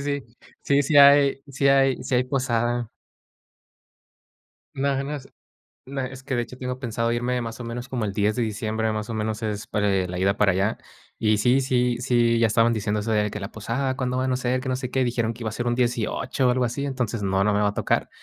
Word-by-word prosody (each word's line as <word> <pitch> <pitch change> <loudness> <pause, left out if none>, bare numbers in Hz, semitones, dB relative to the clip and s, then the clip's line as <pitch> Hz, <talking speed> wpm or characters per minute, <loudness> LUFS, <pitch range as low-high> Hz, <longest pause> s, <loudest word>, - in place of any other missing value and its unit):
sí. 140 -4 -4 0.3
Sí, 140 0 +3
sí 145 +2 +1
hay 140 -1 +7
sí 140 0 0
hay 135 -1 +3
sí - - -2
hay 125 - +2
posada. 120 -3 -1 1.9
No, 135 0 0
no 145 +1 -4
sé, 130 - -18 0.6
no, 135 +1 -4
es 130 0 -6
que 130 -1 -3
de 120 - +1
hecho, 125 +1 -8
tengo 125 0 -4
pensado 115 -2 -1
irme 125 +1 -1
más 115 -1 -6
o - - -6
menos, 120 +1 -5
como 125 -3 -3
el 105 - -1
10 105 +3 +1
de 125 - -1
diciembre, 110 +1 -2
más 110 0 -4
o - - -3
menos, 110 0 -2
es 105 -2 -3
para, 105 -1 0
eh, 95 -2 +1
la 90 0 -4
ida 100 +2 +2
para 105 -2 +3
allá. 95 +4 0 0.4
Y 110 -1 +2
sí, 125 +5 +3
sí, 125 -2 +1
sí, 120 -2 +2
ya 115 - +4
estaban 115 +2 +3
diciéndo 105 -1 -1
eso, 110 +2 -2
de 105 -1 +1
que 105 - -5
la 100 0 -6
posada, 125 +5 -2
cuando 125 -1 -2
van 130 0 0
a - - +1
ser, 125 0 0
que 130 - -7
no 130 - 0
sé 125 -1 -5
qué, 130 -1 +1
dijeron 120 -2 -1
que 115 +1 -9
iba 110 - -1
a - - -8
ser 120 - -3
un 120 - +1
18 125 +1 0
o - - +5
algo 125 0 +1
así. 130 +4 -3
Entonces 125 -6 -2
no, 95 0 +1
no 105 - +2
me 105 - +2
va 105 - +3
a 100 - -5
tocar, - - 0
120 Hz, 245 wpm, -24 LUFS, 110-130 Hz, 1.9 s, hay